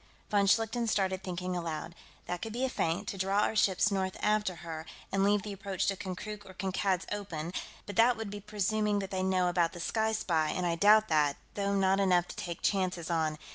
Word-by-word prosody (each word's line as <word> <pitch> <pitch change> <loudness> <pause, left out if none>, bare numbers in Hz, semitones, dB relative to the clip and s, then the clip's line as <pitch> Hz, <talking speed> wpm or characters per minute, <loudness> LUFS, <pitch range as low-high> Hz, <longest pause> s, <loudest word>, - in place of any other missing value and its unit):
Von 200 -1 +3
Schlichten 225 +3 +2
started 190 -3 +1
thinking 180 0 -3
aloud: 170 -1 -4 0.3
"That 180 0 -4
could 225 -1 -5
be 250 +3 0
a - - -1
feint, 165 -8 -1
to 195 - -5
draw 195 +2 +2
our 220 - +1
ships 205 0 +3
north 190 -1 -1
after 210 -3 +1
her, 160 -1 -6 0.2
and 195 0 +2
leave 205 0 +3
the 210 -2 -5
approach 195 -1 -2
to 195 - +1
Konkrook 205 +3 -6
or 190 -2 -13
Kankad's 190 0 0
open, 180 -5 -4 0.3
but 205 -3 -7
that 235 +1 +5
would 220 -2 -5
be 205 - -5
presuming 210 +1 0
that 195 -1 -3
they 190 -1 -1
know 185 -1 +2
about 175 -2 +1
the 175 - -8
Sky 220 +5 0
Spy, 160 -7 +1
and 180 +3 -1
I 170 - +1
doubt 210 +5 +5
that, 150 -3 +3 0.2
though 200 0 0
not 195 0 +3
enough 180 -3 +3
to - - -7
take 170 -1 -6
chances 185 -4 0
on. 160 -2 0
190 Hz, 215 wpm, -31 LUFS, 175-205 Hz, 0.3 s, that